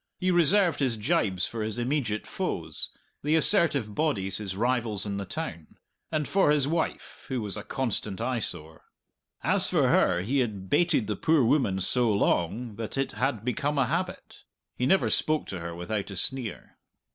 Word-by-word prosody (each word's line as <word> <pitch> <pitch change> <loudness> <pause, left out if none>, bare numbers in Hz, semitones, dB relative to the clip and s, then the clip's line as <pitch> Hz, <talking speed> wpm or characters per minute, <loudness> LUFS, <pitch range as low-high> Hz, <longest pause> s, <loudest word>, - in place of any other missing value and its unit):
He 185 0 +1
reserved 175 0 +4
his 130 -5 +1
gibes 105 - +1
for 115 - -5
his 110 +1 -2
immediate 120 -4 -1
foes, - - -4 0.3
the 150 +2 +2
assertive 150 - +3
bodies 100 - 0
his 100 -3 -5
rivals 115 -2 0
in 100 -1 -3
the 100 - -4
town 85 - -6 0.3
and 155 -2 -1
for 195 -5 +3
his 145 -2 +3
wife, 165 +1 -3
who 130 -2 -2
was 105 -3 -4
a 105 - -5
constant 110 -5 -3
eyesore. 90 -11 -4 0.6
As - - +2
for - - +3
her, 90 0 +3
he 135 +7 0
had 100 -6 -3
baited 175 -10 +3
the 105 0 -2
poor 160 +4 +3
woman 115 -7 +2
so 120 +4 +2
long 105 +3 0
that 115 +3 -5
it 135 0 0
had 115 0 -2
become 145 +3 -1
a 135 - +3
habit; 180 +6 -4 0.3
he 125 - 0
never 190 +7 +3
spoke 155 0 +2
to 95 - -4
her 85 0 -6
without 95 +4 -3
a 100 - -7
sneer. 125 +4 -2
120 Hz, 175 wpm, -27 LUFS, 100-150 Hz, 0.6 s, reserved